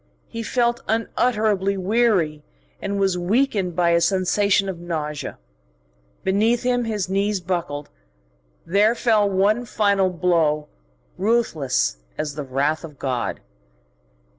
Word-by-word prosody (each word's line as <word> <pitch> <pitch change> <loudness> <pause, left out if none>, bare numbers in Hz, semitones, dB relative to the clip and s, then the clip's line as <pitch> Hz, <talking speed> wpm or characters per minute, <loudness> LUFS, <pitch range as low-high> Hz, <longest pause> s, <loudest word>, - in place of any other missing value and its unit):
He 230 - -6
felt 240 +1 0
unutterably 215 -3 +1
weary, 190 -6 +1 0.4
and 200 0 -2
was 190 -2 +1
weakened 195 -2 +1
by 170 -1 +3
a 170 0 +3
sensation 195 +2 +2
of 185 -3 -4
nausea. 155 -4 -4 0.9
Beneath 220 +6 +2
him 245 -1 +1
his 210 -4 -2
knees 200 +1 0
buckled. 170 -5 -3 0.7
There 205 +6 +3
fell 215 -4 +2
one 200 +5 +2
final 200 -4 +2
blow, 165 -4 +1 0.5
ruthless 155 - +1 0.2
as 150 -2 -3
the 150 - -5
wrath 140 +4 -1
of 150 -4 -10
God. 125 -4 -2
190 Hz, 115 wpm, -22 LUFS, 165-215 Hz, 0.9 s, by